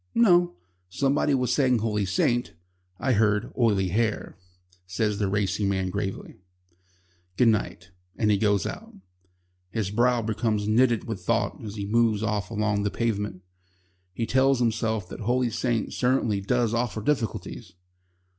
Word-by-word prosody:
"No. 175 -6 +4 0.3
Somebody 140 +5 +1
was 125 -2 0
saying 130 -4 +3
Holy 105 -2 -1
Saint." 120 +6 0 0.5
"I 130 - +1
heard 105 +1 +1
Oily 105 -6 +2
Hair," 110 +3 -1 0.5
says 105 +2 -1
the 100 - +1
racing 100 0 0
man 95 -1 -1
gravely. 95 +1 -5 1.0
"Good 120 - +5
night." 100 -4 -2 0.2
And 105 -2 +1
he 100 - +2
goes 100 -2 +2
out. - - -7 0.7
His 100 -1 -3
brow 120 +2 +2
becomes 110 -1 -1
knitted 115 +1 +3
with 110 -5 -5
thought 90 - -1
as 105 -1 -7
he 100 -2 -4
moves 110 0 +2
off 105 -3 -1
along 105 -2 0
the 100 - 0
pavement. 105 -4 -2 0.7
He 115 +5 -3
tells 130 +3 +3
himself 110 -4 -1
that - - -9
Holy 120 +2 0
Saint 115 0 -1
certainly 125 -5 +1
does 120 +2 0
offer 115 -2 -1
difficulties. 125 - -3
110 Hz, 145 wpm, -26 LUFS, 100-120 Hz, 1.0 s, Good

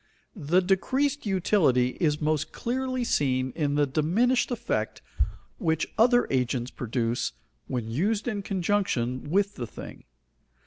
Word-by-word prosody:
The 175 0 +2
decreased 260 +9 +1
utility 170 -10 +3
is 150 -4 +2
most 155 0 0
clearly 255 +1 -2
seen 130 - +1
in 145 -3 0
the 145 0 +3
diminished 180 - +2
effect 240 -1 -2 0.6
which 160 -6 0
other 245 +2 +5
agents 125 -1 0
produce 120 0 -2 0.3
when 120 -3 -3
used 200 - 0
in 210 -4 -1
connection 175 - -1
with 200 +4 +1
the 120 - -4
thing. - - -10
165 Hz, 125 wpm, -27 LUFS, 130-215 Hz, 0.6 s, other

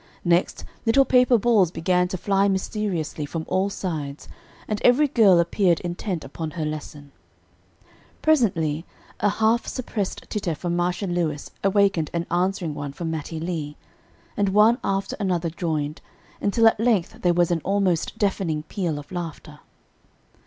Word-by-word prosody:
Next, 175 +1 +1 0.2
little 260 +4 +4
paper 250 -1 +5
balls 215 -5 +3
began 180 +1 +1
to 185 - -4
fly 195 +2 +2
mysteriously 190 -5 -2
from 160 +2 -4
all 190 +2 +1
sides, 155 -8 -5 0.4
and 210 -1 -2
every 275 +5 +5
girl 215 -10 +5
appeared 170 0 +2
intent 175 -1 -4
upon 155 +3 -5
her 155 - -1
lesson. 150 -2 -7 1.1
Presently, 175 - +2 0.4
a 205 - +3
half 220 +3 +1
suppressed 220 -6 -4
titter 185 -6 -2
from 175 +3 -3
Marcia 175 +3 0
Lewis 170 -5 -2
awakened 195 -5 +2
an 170 0 -1
answering 180 -2 0
one 145 -1 -5
from 165 +3 -4
Mattie 160 0 -4
Lee, 160 -3 -4 0.6
and 200 -1 +1
one 215 +5 +5
after 195 0 -1
another 180 -4 -1
joined, 155 -3 -3 0.4
until 225 +3 +2
at 225 - +5
length 225 -6 +1
there 175 -1 +2
was 175 0 +2
an 165 -2 0
almost 195 -1 0
deafening 185 -7 0
peal 170 -3 -3
of 145 0 -10
laughter. 165 -4 -6
180 Hz, 145 wpm, -24 LUFS, 160-205 Hz, 1.1 s, paper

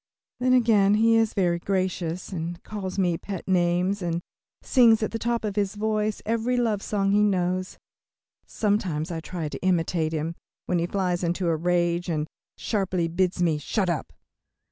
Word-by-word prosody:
Then 255 0 +3
again 215 -5 +4
he 225 +1 +4
is 225 -1 +2
very 175 -3 +1
gracious, 185 -2 -2
and 170 -1 -5
calls 200 -3 -5
me 175 -3 +1
pet 195 -4 -6
names, 180 +2 +1
and 170 0 -2 0.4
sings 230 -4 +5
at - - -1
the 225 - -3
top 235 0 -1
of 205 -2 -3
his 205 -1 0
voice 215 0 -1
every 230 +3 0
love 225 -4 +1
song 195 -1 0
he 205 +1 +4
knows. 185 -2 0 0.7
Sometimes 185 -6 -1
I 165 - -3
try 165 -1 -5
to - - -7
imitate 170 -3 +1
him, 160 +1 -2 0.3
when 180 - 0
he 170 - 0
flies 180 -2 -1
into 175 +1 0
a 165 - +2
rage 175 +1 0
and 155 -2 -1 0.3
sharply 185 -5 -1
bids 180 +1 0
me 160 -3 +1
"shut 185 +5 0
up." 160 - -4
185 Hz, 170 wpm, -25 LUFS, 175-210 Hz, 0.7 s, sings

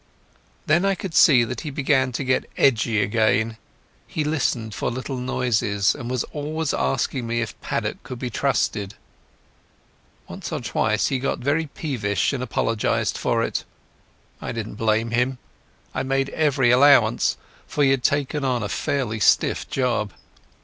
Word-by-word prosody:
Then 170 +4 +3
I 195 0 +2
could 185 -1 -6
see 135 -8 +6
that 120 +2 -4
he 155 - -5
began 135 -2 +1
to 135 - -2
get 130 -1 0
edgy 115 -4 +3
again. 110 +1 +1 0.5
He 155 - -2
listened 125 -7 -1
for - - -2
little 130 +2 -4
noises, 110 -5 +1
and 120 -4 -7
was 125 -2 0
always 155 +1 -2
asking 130 -1 -1
me 120 +1 -1
if 115 - -6
Paddock - - -3
could 130 - -8
be 125 0 -4
trusted. 105 -1 -1 1.3
Once - - -7
or - - -2
twice 110 -1 0
he 135 - 0
got 135 - -1
very 150 +5 0
peevish, 125 -8 -1
and 135 - -3
apologized 115 -3 0
for - - 0
it. - - -2 0.8
I - - -4
didn't 115 -2 -5
blame 110 +1 0
him. 125 +2 +1 0.6
I - - -1
made 135 0 0
every 135 -5 +2
allowance, 125 -3 +5 0.3
for 145 - 0
he 135 - +4
had 135 -2 +1
taken 145 +2 0
on 125 -4 0
a 100 - -3
fairly 120 -2 -2
stiff - - +2
job. 120 -6 -1
125 Hz, 155 wpm, -23 LUFS, 115-140 Hz, 1.3 s, see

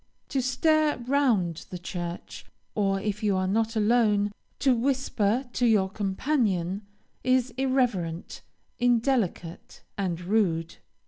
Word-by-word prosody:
To 270 - 0
stare 300 +4 +2
round 240 - +1
the 180 - -5
church, 175 0 -6 0.3
or 195 -2 +1
if 210 +2 -3
you 205 -2 +2
are 185 - 0
not 225 +4 0
alone, 210 -2 +3 0.3
to 270 -2 +3
whisper 250 -2 0
to 245 - +2
your 195 -4 +3
companion, 195 - 0 0.4
is 255 -1 +2
irreverent, 245 -11 -1 0.4
indelicate, 235 -8 0 0.2
and 180 -4 -1
rude. 180 -4 0
215 Hz, 115 wpm, -27 LUFS, 190-255 Hz, 0.4 s, alone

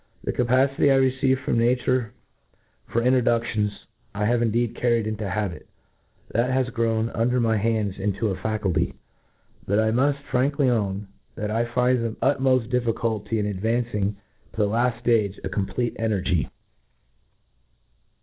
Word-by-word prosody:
The - - -1
capacity 130 +3 +2
I 135 - +5
received 130 0 +2
froni 130 - 0
nature 125 0 +1 0.8
for 115 - 0
introdudions^ 120 -4 +2 0.5
I 105 +1 0
have 120 +2 +2
indeed 120 0 +1
carried 120 -2 +1
into 110 -1 -3
habi 100 -1 -2
t - - -23 0.7
t - - +1
hat 125 +2 +2
has 130 -1 +1
grown 115 -1 0
un 115 +2 0
der 125 0 +1
my 115 -2 +2
hands 105 -2 -1
into 100 +1 -2
2l 95 -3 -1
f - - -16
acuity 105 -5 0 0.3
"— - - -33
h\xt 100 +2 +2
I 110 0 +2
muft 140 +4 +1
frank 135 +1 0
ly 140 -4 +3
own, 100 -4 -1 0.3
that 105 0 -3
I 115 +2 +1
find 125 +1 +1
the 115 - 0
utmoft 130 -3 +2
difficulty 115 -3 -1
in 105 - 0
advan^ 115 +4 -1
cing 105 -1 -1 0.4
to 110 - -2
the - - +2
laft 115 +2 0
ftage, 105 -4 +2
a - - -3
complcat 105 +5 -2
energy. 95 - 0
115 Hz, 165 wpm, -24 LUFS, 105-125 Hz, 0.8 s, I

